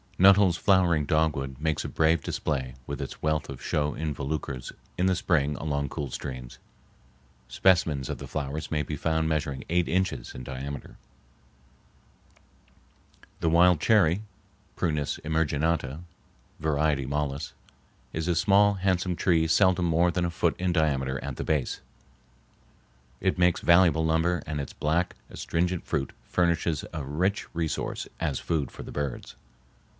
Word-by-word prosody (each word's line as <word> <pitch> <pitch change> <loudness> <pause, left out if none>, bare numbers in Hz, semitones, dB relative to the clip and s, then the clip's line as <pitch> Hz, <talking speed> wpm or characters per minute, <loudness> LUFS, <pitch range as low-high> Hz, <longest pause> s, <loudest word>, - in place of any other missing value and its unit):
Nuttall's 95 -2 +6
flowering 90 -6 +3
dogwood 70 -4 0
makes 80 0 -1
a - - -4
brave 80 -1 +2
display 65 -5 -2
with 70 +1 -5
its 70 - -7
wealth 80 0 0
of 65 -2 -8
show 75 0 0
involucres 70 -4 -4 0.2
in 90 - +1
the 95 - +3
spring 75 -5 +1
along 70 -2 -2
cool 70 -3 -5
streams. 65 -2 -7 0.9
Specimens 75 -1 +2
of - - -4
the - - -7
flowers 75 +1 -4
may 75 -2 0
be 75 - -4
found 80 +2 0
measuring 75 -3 -2
eight 85 +1 +2
inches 90 -9 -1
in 65 - -7
diameter. 70 +2 -6 2.5
The 80 - +2
wild 85 0 +5
cherry 95 0 +3 0.5
(Prunus 75 -4 -1
emarginata, 80 -1 0 0.6
var. 75 0 +1
mollis) 70 0 -2 0.6
is 80 +1 -2
a 90 - +2
small, 100 +3 +4
handsome 90 -1 0
tree 85 -3 +2
seldom 90 +1 +3
more 85 +1 +3
than 90 0 0
a 85 - -2
foot 80 - +1
in 90 0 +1
diameter 70 -5 0
at 70 -2 -4
the - - -3
base. 75 -4 -1 1.4
It 95 -1 0
makes 90 -1 +3
valuable 85 -2 +5
lumber 80 +1 +1
and 75 -1 -3
its 70 - -7
black, 85 +4 0 0.2
astringent 90 +1 -1
fruit 70 - -2 0.2
furnishes 85 -3 +1
a 80 - -4
rich 90 +10 -1
resource 80 -3 -2
as 75 -5 -1
food 75 -6 -1
for - - -9
the - - -9
birds. 70 -3 -4
80 Hz, 140 wpm, -27 LUFS, 70-85 Hz, 2.5 s, Nuttall's